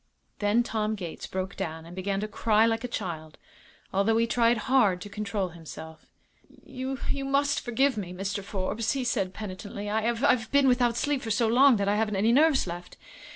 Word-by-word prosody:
Then 210 +3 +2
Tom 220 -2 -1
Gates 175 -5 -7
broke 190 +1 -4
down 160 -4 -5
and 170 +1 -11
began 195 +1 -2
to 215 - -2
cry 215 +1 +2
like 225 0 0
a - - -2
child, 165 -9 -5 0.6
although 200 +4 +2
he 230 - +3
tried 235 0 +2
hard 235 -9 +3
to 205 - -7
control 200 -2 -3
himself. 160 -1 -11 0.6
"You 265 -1 -5
you 275 -1 -2
must 280 +1 +1
forgive 260 +1 +1
me, 185 -4 -4
Mr. 195 +2 -4
Forbes," 200 +3 -2
he 270 -2 -2
said, 195 -6 0
penitently; 205 0 -6
"I 220 +2 +1
I've 235 -1 +1
been 280 -1 +4
without 245 -2 +3
sleep 285 -1 0
for 225 - -5
so 225 +2 +2
long 255 +3 +6
that 200 -2 -1
I 205 +1 +2
haven't 215 -1 0
any 210 +4 +3
nerves 295 +2 +4
left." 175 0 -8
215 Hz, 195 wpm, -27 LUFS, 195-245 Hz, 0.6 s, long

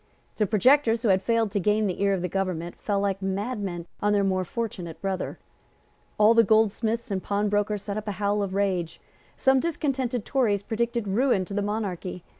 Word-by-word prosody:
The 210 - +2
projectors 235 +2 +3
who 225 - +2
had 190 -1 +4
failed 230 0 +1
to 200 - 0
gain 210 +2 +2
the 190 -1 -2
ear 200 0 +3
of 190 -2 -1
the - - 0
government 180 -2 -3
fell 205 -2 -1
like 195 -1 -1
madmen 195 -2 -3 0.2
on 210 0 +2
their 200 -1 +3
more 185 -1 +1
fortunate 180 -6 -5
brother. 190 0 -3 0.8
All 215 +2 +6
the 230 0 +6
goldsmiths 220 +1 +1
and 190 -1 -1
pawnbrokers 205 0 0
set 200 0 -4
up 215 0 -5
a 205 - -1
howl 205 +1 0
of 195 -1 -3
rage. 185 -4 -1 0.4
Some 265 0 +4
discontented 265 -7 -1
Tories 215 -7 +1
predicted 235 0 -2
ruin 205 -1 +2
to 200 - -8
the 205 - 0
monarchy. 200 -4 -3
205 Hz, 190 wpm, -26 LUFS, 195-225 Hz, 0.8 s, All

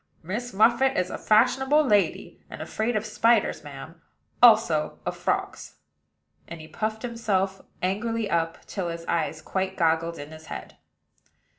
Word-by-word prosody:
"Miss 225 +9 -4
Muffit 235 +6 +3
is 180 0 0
a - - -4
fashionable 265 +7 +3
lady, 205 -6 0
and - - -9
afraid 220 +2 -2
of 215 0 -1
spiders, 230 +2 +2
madam; - - -10 0.4
also - - +5
of - - -2
frogs." - - -3 0.7
And 170 - -8
he 155 - -10
puffed 215 +5 -4
himself 200 -5 -1 0.2
angrily 220 +4 -1
up, 165 -2 -2
till 190 -4 -4
his 165 0 -6
eyes 160 -2 -2
quite 190 +2 -3
goggled 165 0 +1
in 145 +2 -9
his 155 0 -12
head. - - -8
200 Hz, 145 wpm, -25 LUFS, 170-230 Hz, 0.7 s, also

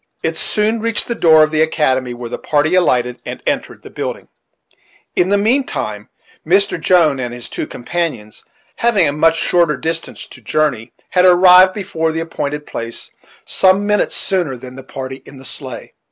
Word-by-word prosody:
It - - -1
soon 215 +2 0
reached 230 0 -2
the 235 - -1
door 160 -8 +5
of 155 - 0
the 155 0 +1
academy, 130 -6 0
where 120 0 -7
the - - -6
party 150 +2 +1
alighted 125 -9 +1
and - - -7
entered - - -3
the - - -12
building. - - -5 0.9
In 180 - +2
the 205 - +3
mean 235 +7 +2
time, 105 - -5 0.3
Mr. 190 0 +1
Jones 160 -6 +3
and 120 -1 -4
his 120 0 -3
two - - -4
companions, 125 -6 -4 0.3
having 215 -8 +2
a - - +1
much 165 +2 +3
shorter 170 -2 +2
distance 165 0 -4
to - - -15
journey, 140 -7 -1 0.2
had 180 0 +3
arrived 185 +1 +7
before 165 -6 -2
the 160 - -3
appointed 150 -3 -4
place 115 0 -6 0.3
some 190 +1 +2
minutes 210 0 +1
sooner 175 -9 -1
than 125 +1 -11
the 135 - -9
party 130 0 -8
in 140 - -14
the 135 - -12
sleigh. 130 -3 -6
160 Hz, 180 wpm, -17 LUFS, 130-185 Hz, 0.9 s, arrived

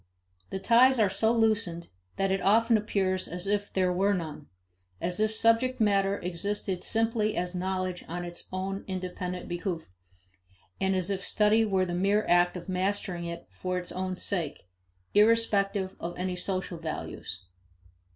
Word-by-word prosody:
The - - -3
ties 245 +6 +5
are 210 -4 +3
so 220 +3 +2
loosened 215 -7 +1 0.3
that 195 0 0
it 195 - +1
often 225 +3 +4
appears 195 -3 0
as 180 +1 -6
if 205 0 -1
there 185 -1 +1
were 200 +3 +2
none; 155 -4 -6 0.5
as 180 +2 0
if 215 0 +2
subject 230 +3 +2
matter 200 -2 +3
existed 185 +1 -3
simply 225 -1 0
as 180 0 -1
knowledge 185 0 -2
on 175 +1 -4
its 175 0 -8
own 190 +1 -3
independent 180 -1 -4
behoof, 175 - -4 0.9
and 190 0 +1
as 185 +1 0
if 195 -1 -2
study 215 +1 +3
were 190 -3 +2
the 175 - -4
mere 200 +4 +2
act 175 +1 +4
of 175 - -9
mastering 185 -2 -1
it 170 0 -6
for 185 0 -3
its 180 -1 -4
own 185 0 -3
sake, 170 -8 -2 0.5
irrespective 205 -3 +3
of 175 +1 -5
any 180 0 -2
social 185 -1 -3
values. 100 - -6
190 Hz, 155 wpm, -28 LUFS, 180-210 Hz, 0.9 s, ties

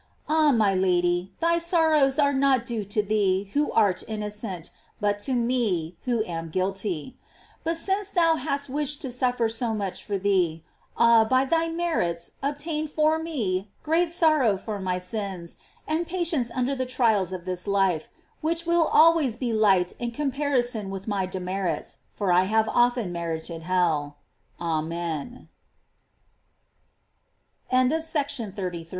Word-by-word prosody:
Ah, 310 -1 +4
my 215 -6 +3
Lady, 180 -1 +1
thy 335 +1 +3
sorrows 320 -5 +3
are 285 -1 +3
not 265 -3 +2
due 230 -4 -3
to 205 +2 -1
thee 195 -2 0
who 295 +1 +1
art 205 -5 +2
inno 210 -1 -3
cent, 195 -6 -6 0.3
but 205 -1 0
to 260 +6 -2
me 230 -9 0
who 240 -3 +1
am 165 -3 -5
guilty. 190 - -3 0.4
But 330 +1 -1
since 390 +3 -1
thou 335 -4 +3
hast 280 0 -2
wished 290 +2 -2
to 265 - -4
suffer 245 -1 +1
so 225 0 -1
much 200 -3 -4
for 200 -2 -2
me, 185 -5 +1 0.3
ah, 235 -1 +6
by 260 +4 +2
thy 330 +4 +1
merits 325 - -1
obtain 300 +2 -2
for 310 +1 +2
me 210 - -2
great 330 +2 +1
sorrow 310 - +3
for 210 +1 -5
my 185 -1 -1
sins, 185 -2 -4 0.3
and 320 +2 -1
patience 335 -8 0
under 255 +2 -1
the 260 -1 -2
trials 220 -7 +2
of 180 -2 -6
this 180 +1 -4
life, 195 -5 +1 0.3
which 335 +2 -1
will 340 -1 +3
always 315 -7 +5
be 240 -1 -2
light 195 -5 +3
in 240 - -2
comparison 255 -5 -1
with 195 +1 -6
my 200 -3 -1
demerits, 185 0 -3 0.2
fo 195 -4 +1
235 Hz, 130 wpm, -25 LUFS, 195-295 Hz, 0.4 s, ah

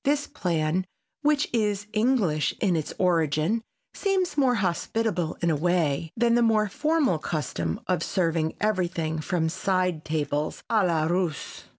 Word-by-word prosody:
This 290 +1 +1
plan, 175 - -1 0.3
which 295 -1 +2
is 210 -3 0
English 210 - +1
in 185 -4 +2
its 155 -2 -2
origin, 170 +3 +1 0.3
seems 385 -3 0
more 265 -4 +3
hospitable 190 -2 -1
in 170 - +3
a - - +2
way 160 -2 0
than 235 0 +3
the 240 - +4
more 215 -2 +3
formal 300 - +1
custom 85 - -3
of 180 -3 0
serving 165 -4 0
everything 175 -6 0
from 160 +1 0
side 180 -2 0
tables, 150 -1 -2
a 220 -3 +4
la 165 -4 +2
Russe. 175 -2 -2
180 Hz, 145 wpm, -26 LUFS, 160-225 Hz, 0.3 s, the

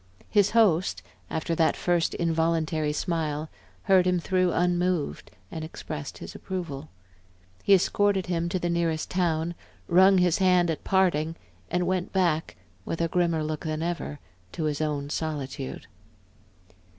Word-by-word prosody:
His 205 -1 +4
host, 185 - +2 0.3
after 160 +1 -2
that 165 -1 +2
first 175 -2 +1
involuntary 160 -2 0
smile, 155 -1 -2 0.3
heard 185 -2 +4
him 180 -1 +2
through 185 +1 +1
unmoved 175 - 0 0.2
and 160 - -5
expressed 155 -2 -7
his - - -8
approval. 160 -6 -5 0.7
He 200 - +6
escorted 195 0 +2
him 170 -1 -1
to 185 - -1
the 175 - -2
nearest 170 -2 -1
town, 170 -2 0 0.3
wrung 190 +2 +6
his 180 -1 +3
hand 180 -2 +4
at 160 - -5
parting, 165 -4 +2 0.3
and 180 0 0
went 185 0 -1
back, 170 -4 +1 0.3
with 165 - -4
a 165 0 +1
grimmer 170 -2 +1
look 155 0 -3
than 155 -1 -2
ever, 170 -4 -3 0.3
to 160 - -3
his 150 -1 -1
own 145 -2 -2
solitude. 145 -4 -4
170 Hz, 140 wpm, -27 LUFS, 155-180 Hz, 0.7 s, He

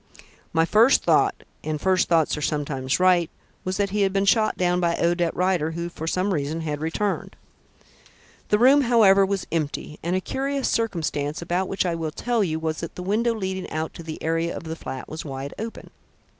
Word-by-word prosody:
"My 165 0 +3
first 225 +9 +5
thought - - +2 0.2
and 155 -1 -2
first 185 +1 +2
thoughts 165 -3 +3
are 150 - -5
sometimes 140 -2 -1
right 180 -2 +4 0.3
was 185 0 -2
that 200 -1 0
he 210 +1 0
had 195 -1 +3
been 195 +1 +1
shot 215 +2 +3
down 180 0 +1
by 170 -1 +1
Odette 170 0 +1
Rider, 180 -4 +1
who 170 +1 -4
for 160 -1 -7
some 185 +4 0
reason 155 +1 -2
had 150 -2 -3
returned. 190 +6 -2 1.1
The 210 - +4
room, 265 +5 +6
however, 220 -6 +5
was 195 -2 -2
empty, 155 -1 -3
and 175 +2 -1
a - - +2
curious 275 +6 -2
circumstance, 160 -9 -1
about 175 +2 -1
which 195 0 -1
I 175 - 0
will 165 -1 -2
tell 235 +7 0
you, 160 -4 -1
was 160 -1 -2
that 165 - -6
the 180 - -6
window 225 +5 +1
leading 190 -3 -4
out 155 +1 -3
to - - -9
the 160 -1 -7
area 165 +1 -1
of - - -8
the 160 0 -5
flat 130 -5 -7
was 155 - -6
wide 135 -1 -6
open." 225 +1 -7
175 Hz, 200 wpm, -24 LUFS, 160-195 Hz, 1.1 s, room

